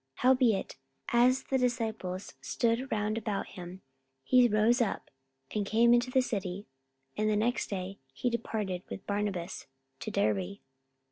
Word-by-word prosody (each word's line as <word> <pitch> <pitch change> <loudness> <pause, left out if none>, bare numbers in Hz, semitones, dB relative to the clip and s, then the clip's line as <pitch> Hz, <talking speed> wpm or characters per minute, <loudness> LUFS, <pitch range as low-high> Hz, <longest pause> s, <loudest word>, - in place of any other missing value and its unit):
44:014:020 - - -10
Howbeit, 250 -5 +3 0.3
as 250 +2 +4
the 265 - 0
disciples 225 -7 -2
stood 235 +3 0
round 215 +1 0
about 210 -2 -3
him, 180 +1 -9 0.4
he 250 - +5
rose 225 +3 +3
up, 220 - -2 0.4
and 210 - 0
came 230 +4 +4
into 240 +1 +3
the 260 0 +3
city: 195 -4 -3 0.5
and 215 0 +1
the 215 - +2
next 235 +4 0
day 195 0 -4
he 190 - -3
departed 215 -6 -2
with - - -7
Barnabas 200 -5 -3 0.3
to - - -4
Derbe. 100 -2 0
215 Hz, 145 wpm, -30 LUFS, 190-240 Hz, 0.5 s, he